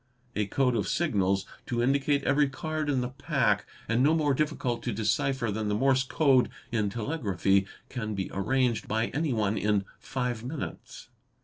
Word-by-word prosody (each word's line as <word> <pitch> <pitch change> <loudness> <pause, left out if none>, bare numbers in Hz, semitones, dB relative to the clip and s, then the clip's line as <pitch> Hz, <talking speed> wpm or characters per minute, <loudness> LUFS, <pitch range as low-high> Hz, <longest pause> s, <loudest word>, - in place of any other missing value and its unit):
A 105 -1 0
code 125 +3 +1
of 105 - 0
signals 100 - +1 0.2
to 120 -1 0
indicate 140 +2 +2
every 145 0 +3
card 155 +2 -3
in 135 -3 +1
the 125 - -2
pack, 135 -6 0 0.2
and 115 +2 +2
no 150 +4 +4
more 150 -3 +2
difficult 130 -5 -1
to 120 - -2
decipher 110 +3 0
than 110 +1 -2
the 105 - +1
Morse 130 +3 +3
Code 135 -2 +3 0.2
in 110 -3 +1
telegraphy, 100 - 0 0.2
can 110 -4 -4
be 95 -1 -2
arranged 120 +2 +1
by 110 +2 0
any 150 +2 -1
one 105 -3 +1
in 105 -2 +1
five 125 -3 -3
minutes. 140 -2 -7
125 Hz, 170 wpm, -28 LUFS, 105-140 Hz, 0.2 s, no